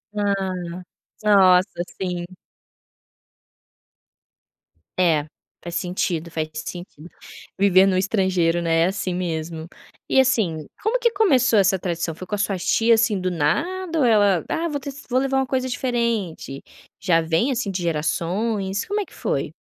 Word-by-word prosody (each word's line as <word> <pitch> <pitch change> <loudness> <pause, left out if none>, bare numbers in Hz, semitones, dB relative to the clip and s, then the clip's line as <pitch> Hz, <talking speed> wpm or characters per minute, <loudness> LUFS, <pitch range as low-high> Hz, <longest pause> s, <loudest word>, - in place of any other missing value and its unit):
Ah, 200 -2 0 0.7
nossa, 190 -3 +6 0.4
sim. 180 -2 -2 2.7
É, 160 -5 +3 0.4
faz 175 0 -7
sentido, 175 -2 -2
faz 155 -1 -3
sentido. 170 0 -8 0.5
Viver 195 -1 +5
no 185 - +2
estrangeiro, 185 -3 +1
né, 165 -1 +2
é - - +4
assim 185 -1 -2
mesmo. 165 -2 -4 0.4
E, - - +4
assim, 200 - +1 0.2
como 455 +4 +1
que 475 -1 +3
começou 265 - +3
essa 195 -1 +3
tradição? 170 -2 -2
Foi 185 +3 -10
com 210 - -2
as 205 - -1
suas 190 -3 -2
tia, 230 +1 +4
assim, 220 -3 +2
do 185 0 -1
nada 330 - -1
ou 260 - +3
ela: 205 -7 +4
"Ah, 335 +1 -1
vou 290 -2 -3
ter 280 +1 -6 0.2
vou 255 - +2
levar 270 0 0
uma 265 - +1
coisa 260 0 -1
diferente." 235 - -2 0.4
Já 170 -4 +3
vem, 165 +12 +1
assim, 235 -5 -2
de 180 -1 -3
gerações? 190 +6 -1
Como 415 +1 -2
é - - -4
que - - -21
foi? - - -2
190 Hz, 150 wpm, -22 LUFS, 170-235 Hz, 2.7 s, nossa